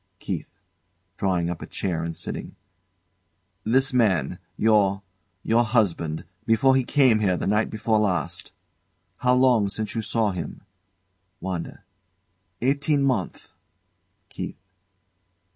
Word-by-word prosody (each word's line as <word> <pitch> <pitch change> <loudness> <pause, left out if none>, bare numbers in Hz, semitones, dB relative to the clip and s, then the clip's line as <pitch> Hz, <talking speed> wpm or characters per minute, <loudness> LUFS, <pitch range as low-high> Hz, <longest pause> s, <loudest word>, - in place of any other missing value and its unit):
KEITH. - - -4 0.7
[Drawing 90 -3 +1
up 80 - -6
a - - -7
chair 85 -4 -2
and 85 0 -4
sitting] - - -5 1.1
This, 130 +4 +2
man, 110 -9 +2 0.2
your 100 -3 +3 0.4
your 115 +2 +3
husband, 90 -10 0 0.2
before 125 +4 +4
he 130 - +3
came 130 -4 +4
here 95 -4 +2
the - - -3
night 105 +2 +2
before 110 0 +1
last 100 -4 -1 0.7
how 125 0 +3
long 125 -5 +4
since 110 +1 -3
you 115 - -1
saw 110 -1 +1
him? 85 -2 -6 0.8
WANDA. 90 -3 -5 0.8
Eighteen 140 +2 +2
month. 125 -9 -2 0.8
KEITH. - - -6
110 Hz, 115 wpm, -25 LUFS, 95-125 Hz, 1.1 s, before